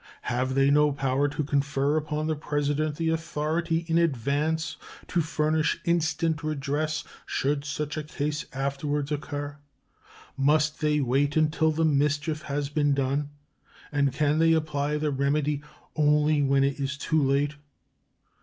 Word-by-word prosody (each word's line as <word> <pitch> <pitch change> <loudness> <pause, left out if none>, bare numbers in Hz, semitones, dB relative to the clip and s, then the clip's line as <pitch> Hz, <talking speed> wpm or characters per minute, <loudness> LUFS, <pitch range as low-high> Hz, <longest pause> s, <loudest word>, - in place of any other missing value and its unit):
Have 130 +2 -1
they 135 +1 +4
no 150 0 +4
power 135 0 +1
to 150 +1 -2
confer 140 0 0
upon 155 0 -1
the 155 0 0
President 145 0 -1
the 165 +1 -1
authority 165 +1 -1
in 165 0 +3
advance 160 +2 0 0.3
to 175 - +1
furnish 155 0 0
instant 165 -2 +1
redress 150 +1 -1 0.2
should 140 +1 0
such 150 0 -3
a 155 - -2
case 150 0 -3
afterwards 140 +1 -2
occur? 145 0 -4 0.8
Must 150 +3 +2
they 150 -1 +2
wait 140 +3 +1
until 155 +1 +3
the 160 +1 +1
mischief 150 +1 +1
has 145 -1 -2
been 145 -1 +1
done, 140 +2 0 0.6
and 140 -2 +2
can 150 +2 +1
they 165 0 +5
apply 150 -2 0
the 150 0 -1
remedy 145 +1 0 0.3
only 150 0 +3
when 135 0 +3
it 140 +1 0
is 140 0 -2
too 155 +1 +1
late? 140 +2 +1
150 Hz, 145 wpm, -27 LUFS, 140-155 Hz, 0.8 s, they